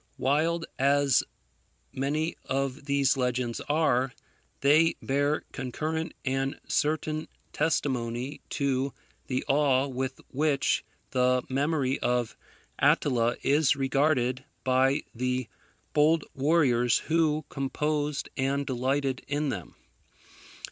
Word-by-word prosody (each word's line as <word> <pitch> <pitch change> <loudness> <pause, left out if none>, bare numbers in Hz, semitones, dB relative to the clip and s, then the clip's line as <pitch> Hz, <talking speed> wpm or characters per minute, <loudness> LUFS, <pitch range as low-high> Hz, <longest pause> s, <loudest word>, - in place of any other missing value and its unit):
Wild 160 +5 +1
as 140 -1 +4 0.7
many 145 +5 -1
of 135 +1 -2
these 140 -2 +2
legends 125 -2 -1
are, 135 -4 +2 0.5
they 155 +4 +5
bear 145 +2 0
concurrent 155 +5 -3
and 135 +1 -1
certain 155 +1 0 0.3
testimony 130 -4 -1
to 135 -1 -1 0.3
the 130 -1 -2
awe 140 -2 +3
with 130 -1 -4
which 145 0 +1 0.3
the 125 0 +2
memory 140 0 0
of 120 -2 0 0.4
Attila 120 -3 +3
was 145 0 +4
regarded 135 -1 +1 0.2
by 135 +3 +2
the 125 0 -1 0.5
bold 155 +1 +4
warriors 135 -5 +3
who 155 -2 +1
composed 145 +1 -1
and 140 +1 0
delighted 130 +1 -1
in 145 +1 -1
them. 90 - -6
135 Hz, 100 wpm, -28 LUFS, 130-150 Hz, 0.7 s, they